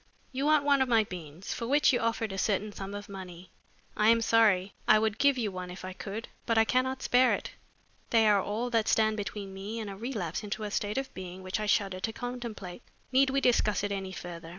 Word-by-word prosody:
"You 270 +1 -2
want 305 -1 +4
one 280 -2 +4
of 260 - +1
my 225 -2 +5
beans, 175 -2 -7
for 230 - -4
which 290 +1 +4
you 245 - +2
offered 230 -2 -1
a - - -5
certain 210 +2 0
sum 200 0 -7
of 205 0 -7
money. 185 -2 -9 0.4
I 210 +1 +4
am 230 0 +5
sorry. 205 -4 +3
I 215 - +7
would 220 -1 0
give 280 -2 +4
you 220 -5 -1
one 185 -1 -6
if 180 +1 -8
I 185 - -6
could, 210 +4 -6 0.2
but 230 -1 +2
I 225 - +6
cannot 260 +2 0
spare 250 +1 +4
it. - - -7 0.6
They 225 -2 +4
are 205 -2 +5
all 225 +5 -3
that 225 -2 +2
stand 220 -1 +3
between 200 -1 -5
me 200 +4 -5
and 210 -3 -5
a - - -7
relapse 210 -7 -4
into 210 +1 -4
a 210 - -4
state 205 +3 -2
of 270 0 -3
being 185 0 -8
which 185 +3 -2
I 215 - -2
shudder 195 -2 +1
to 225 +4 -3
contemplate. 240 -6 -6 0.3
Need 265 +1 +4
we 275 +1 +1
discuss 215 -5 +2
it 205 - -1
any 190 -1 -3
further? 170 -2 -8
215 Hz, 235 wpm, -29 LUFS, 195-235 Hz, 0.6 s, I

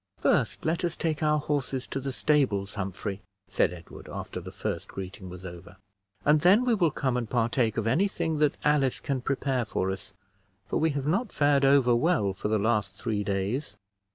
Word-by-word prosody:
"First, - - +1
let 165 +3 0
us 175 -1 -1
take 160 -2 -2
our 150 0 +3
horses 140 -3 -2
to 135 - -4
the 135 0 -3
stables, 125 -9 +1
Humphrey," 100 0 -4 0.3
said 95 - +2
Edward, 85 -2 -11
after - - -5
the - - -9
first - - -4
greeting 95 0 -7
was 90 +1 -9
over, 90 +1 -10 0.5
"and 150 +1 +5
then 195 +9 +5
we 245 - +3
will 180 -7 +3
come 130 -3 -1
and 120 -3 -3
partake 115 -1 +1
of 115 - 0
any 170 - +3
thing 165 -5 -2
that 150 -2 +2
Alice 145 -3 +2
can 135 -4 -2
prepare 135 -1 0
for 95 -3 -1
us, 95 +1 -7 0.5
for - - -1
we 160 - +2
have 140 - -3
not 200 +10 0
fared 145 -1 +3
over 135 -3 +5
well 120 - +2
for 100 - -4
the 110 +1 +2
last 105 -2 0
three 105 0 -2
days." 100 +5 -2
130 Hz, 195 wpm, -28 LUFS, 100-150 Hz, 0.5 s, and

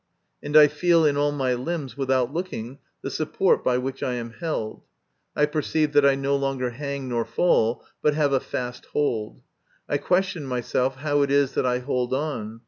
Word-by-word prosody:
and 145 +1 +2
I 150 -1 +9
feel 165 +2 +3
in 145 -1 +3
all 145 0 +2
my 135 -3 0
limbs, 135 +2 -4
without 130 -2 0
looking, 140 -8 -5 0.2
the - - -4
support - - +1
by 125 -1 +2
which 130 +1 -4
I 125 - -1
am 120 -1 -5
held. 115 -6 -4 0.5
I 150 - +4
perceive 150 0 -1
that 145 -1 +6
I 140 - +4
no 135 +1 0
longer 135 -3 -1
hang 140 +1 -5
nor 120 -2 0
fall, 115 -6 +1 0.2
but 150 -1 +2
have 145 -2 +2
a 135 - +4
fast 125 -1 -5
hold. 115 -8 -1 0.4
I 145 - +1
question 180 -4 0
myself 125 +1 -1
how 145 +1 0
it 140 - +1
is 140 -1 +2
that - - +1
I 125 0 +1
hold 125 0 -1
on. 125 -7 -4
140 Hz, 190 wpm, -24 LUFS, 125-150 Hz, 0.5 s, I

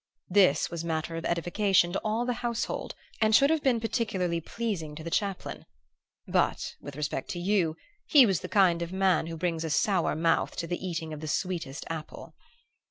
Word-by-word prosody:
This 190 -2 +4
was 170 -1 -4
matter 165 0 -2
of 165 - -5
edification 175 +1 +2
to - - -1
all 220 +3 0
the 245 - 0
household 235 -1 -3 0.3
and 215 0 +5
should 280 +4 +5
have 320 -2 +2
been 255 -4 +2
peculiarly 200 -7 -1
pleasing 170 -7 -4
to 155 - -8
the 165 - -6
chaplain; 200 0 -2 0.6
but, - - 0
with 145 -1 -8
respect 150 -2 -3
to 175 - -4
you, 175 -4 +1 0.3
he 285 -5 +8
was 195 -6 +1
the 180 - -7
kind 180 -4 +4
of 170 0 -4
man 190 -4 +2
who 165 0 -5
brings 165 -1 -1
a 160 - -3
sour 175 +3 +2
mouth 165 +1 +1
to - - -3
the 175 +2 -4
eating 165 -3 -4
of 150 - -6
the 155 - -6
sweetest 160 -4 -3
apple. 160 -1 -7
175 Hz, 190 wpm, -28 LUFS, 165-205 Hz, 0.6 s, he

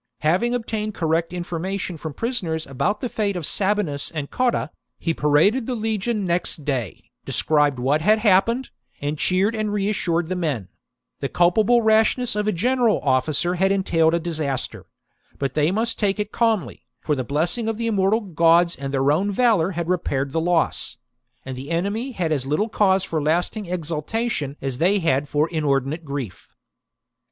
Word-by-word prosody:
Having 185 +11 +2
obtained 215 -3 -3
correct 165 0 0
information 180 +1 -4
from 155 -2 -7
prisoners 185 -10 -2
about 180 +10 -1
the 250 - -1
fate 210 -4 -1
of 175 -4 -2
Sabinus 190 -8 +1
and 150 -3 -5
Cotta, 245 - 0 0.3
he 165 - -1
paraded 165 - +2
the 255 - -1
legion 220 -1 -1
next 170 -4 -1
day, 125 - -3
described 145 -3 +1
what 135 +5 +1
had 215 +6 +4
happened, 220 +4 +2 0.3
and 145 +1 -3
cheered 190 +4 +2
and 215 -1 -2
reassured 195 -5 0
the 185 - -2
men: 145 - -2 0.3
— - - -60
the 140 - -2
culpable 215 +7 +3
rashness 220 +3 +3
of 210 0 -1
a - - +3
general 235 +4 +2
officer 145 +6 +1
had 190 +2 +2
entailed 165 -4 +2
a - - +1
disaster; 155 -6 -3 0.5
but 135 -2 -2
they 150 +1 +2
must 225 +5 -1
take 200 -1 +1
it 210 0 -2
calmly, 225 -5 -1
for 150 - -1
the 130 - -2
blessing 165 - -1
of 225 -1 -1
thejmmortal 210 -3 0
gods 170 +1 +4
and 135 0 -5
their 135 +1 +2
own 185 +7 +1
valour 205 -6 +3
had 170 -1 -3
repaired 140 -7 -1
the 160 - 0
loss; 170 -1 0 0.5
and 130 -1 -5
the 135 +3 -8
enemy 200 +10 -2
had 170 -7 -2
as 135 -4 -1
little 180 +11 0
cause 195 -3 +2
for 160 -2 -2
lasting 175 +7 0
exulta 175 +7 -2
tion 145 -6 -3
as 135 -2 -3
they 190 +5 +3 0.3
for 150 +2 +1
inordinate 150 0 -1
grief. 140 - -6
175 Hz, 170 wpm, -22 LUFS, 150-210 Hz, 0.5 s, had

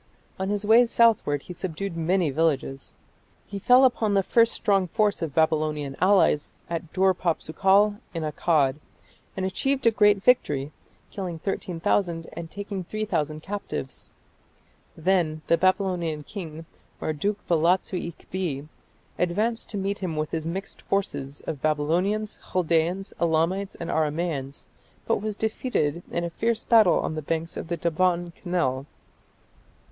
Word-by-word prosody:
On 190 +1 -1
his 205 0 -1
way 230 +3 +6
southward 225 -12 +3
he 180 - -8
subdued 185 +1 -4
many 165 -1 +1
villages. 135 -3 -1 0.5
He 200 - -6
fell 250 +5 +6
upon 225 -5 +2
the 195 - +3
first 230 +4 +4
strong 195 -3 +1
force 205 +3 +1
of 160 -4 -3
Babylonian 155 -3 +1
allies 180 -6 +3 0.2
at 165 -1 -4
Dur 190 0 +3
papsukal 190 +4 +2
in 165 -2 -4
Akkad, 150 -3 +1 0.6
and 190 - -1
achieved 265 +8 -1
a 230 - +6
great 210 -2 +4
victory, 150 - +2 0.4
killing 180 -4 -4
13,000 170 -1 -1
and 170 -1 -7
taking 200 -1 -5
3000 165 -7 -2
captives. 200 -9 -5 0.9
Then 160 -3 +1
the - - +4
Babylonian 180 -4 0
king, 165 -4 -8 0.3
Marduk 195 +7 -1
balatsu 175 +2 +2
ikbi, 165 -5 -5 0.5
advanced 215 +7 0
to 210 - -4
meet 200 +1 -2
him 180 -5 -3
with 155 0 -2
his 160 -1 -2
mixed 190 +4 -5
force 195 0 -1 0.3
of 145 -4 -4
Babylonians, 175 +8 0
Chaldaeans, 175 +2 +1
Elamites, 170 +4 +1
and 170 - -5
Aramaeans, 150 -3 -2 0.4
but 225 - +1
was 215 0 -3
defeated 205 - -1
in 170 - -2
a 170 - -3
fierce 230 +5 -1
battle 220 -6 +5
on - - -2
the 155 - -3
banks 165 +2 -3
of - - -5
the 170 0 -2
Daban 170 +1 0
canal. 145 -8 -1
175 Hz, 140 wpm, -25 LUFS, 160-200 Hz, 0.9 s, way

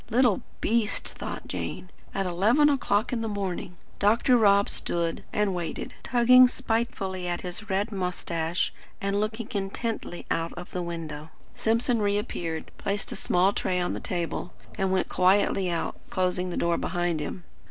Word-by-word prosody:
"Little 240 -3 +3 0.2
beast!" 225 -1 +1
thought - - -6
Jane. 185 - -5 0.2
"At 195 - -1
eleven 215 - +4
o'clock 235 -5 +1
in 235 - 0
the 225 - -1
morning!". 195 -3 -3 0.2
Dr. 230 +5 +4
Rob 200 -3 +5
stood, 170 -1 -1
and 210 -2 +1
waited; 175 -2 -4
tugging 250 +1 +7
spitefully 225 -7 -2
at 175 0 -2
his 185 +4 -6
red 200 +3 0
moustache, 180 -3 -1 0.3
and 200 +1 0
looking 215 +1 -2
intently 200 -1 -3
out 165 0 0
of 175 - -9
the 180 - -2
window. 160 -3 -5 0.2
Simpson 230 +1 +1
reappeared, 200 -5 -2
placed 200 +1 -2
a - - -3
small 185 +3 +2
tray 180 -2 0
on 175 - 0
the - - -3
table, 175 0 -3 0.2
and 190 -1 0
went 190 -1 +1
quietly 190 0 +3
out, 170 -1 -2
closing 185 0 0
the 175 - -4
door 170 0 +1
behind 175 -2 0
him. 160 +4 -5
195 Hz, 155 wpm, -27 LUFS, 175-215 Hz, 0.3 s, tugging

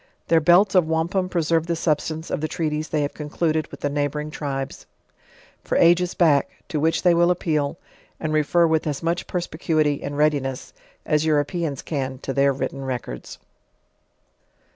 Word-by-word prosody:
Their 165 - +5
belts 175 +5 +5
of 180 -4 +4
wampum 170 +4 0
preserve 165 -2 +1
the 170 - 0
substance 160 0 -1
of - - -2
the 155 - 0
treaties 155 -1 -2
they 150 -2 0
have 145 - -3
concluded 155 +1 -1
with - - -11
the 145 - 0
neighboring 145 +1 -2
tribes; 135 -3 -5 0.8
for - - -1
ages 175 +1 +4
back, 155 -5 +3 0.2
to 155 - -1
which 160 +2 +1
they 175 -2 +5
will 175 +1 +4
appeal, 155 -4 0 0.4
and 155 -1 -2
refer 155 +3 +3
with 160 -1 +1
as 145 +1 -3
much 170 +1 -1
perspicuity, 155 -4 0
and 145 0 -5
readiness, 145 -4 0 0.3
as 150 -2 +2
Europeans 155 -1 0
can 135 -4 -3
to 135 - -3
their 140 0 +3
written 135 0 -4
records. 130 -2 -5
155 Hz, 165 wpm, -23 LUFS, 145-170 Hz, 0.8 s, Their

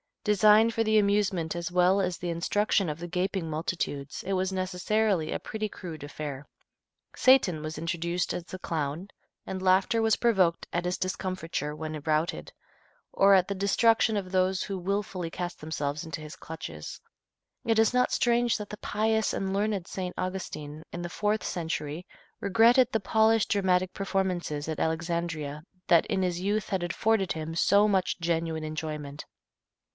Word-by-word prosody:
Designed 210 +2 +5
for 225 - +2
the 215 -1 +4
amusement 200 -5 +1
as 170 0 -4
well 180 +2 +4
as 180 -2 -1
the 175 - -4
instruction 185 +2 +1
of 150 - -3
the 175 - -5
gaping 180 -1 -2
multitudes, 150 -3 -3
it 195 - -1
was 190 0 0
necessarily 185 -1 0
a - - -2
pretty 215 0 -4
crude 165 -7 -8
affair. 145 -1 -6 0.7
Satan 235 -12 +4
was 155 0 -5
introduced 170 +2 -2
as 175 - -5
the 185 - -8
clown, 160 +3 -3 0.4
and 190 -1 -5
laughter 190 +4 +3
was 225 -1 +3
provoked 190 -8 +2
at 175 +1 -1
his 180 0 -1
discomfiture 185 -5 -3
when 155 0 -5
routed, 155 +2 0 0.6
or 195 0 +5
at 185 -1 +3
the 200 - -2
destruction 220 +3 +3
of 185 -2 -4
those 185 0 +1
who 195 -2 -4
wilfully 185 -2 -3
cast 175 0 -5
themselves 150 -1 -3
into 160 -2 -6
his 155 +3 -9
clutches. 80 - -8 0.6
It 225 -1 +2
is 225 +2 +4
not 250 0 +2
strange 240 -1 +2
that 210 -2 -7
the 210 - -7
pious 220 +1 0
and 190 0 -2
learned 200 -2 -1
St. 180 -2 -5
Augustine, 160 -5 -5
in 175 - -5
the 175 - -4
fourth 210 +4 0
century, 160 -1 -4 0.3
regretted 230 +5 +4
the 225 - +1
polished 220 +1 +3
dramatic 185 -2 +2
performances 185 -6 -2
at 160 -1 -3
Alexandria 160 -2 -2 0.2
that 170 -1 +5
in 190 - 0
his 180 -2 0
youth 205 +3 -1
had 190 -4 -1
afforded 195 +2 +1
him 160 0 -5
so 200 +4 +4
much 190 -3 +1
genuine 165 -1 -1
enjoyment. 155 -2 -5
185 Hz, 160 wpm, -28 LUFS, 160-205 Hz, 0.7 s, Designed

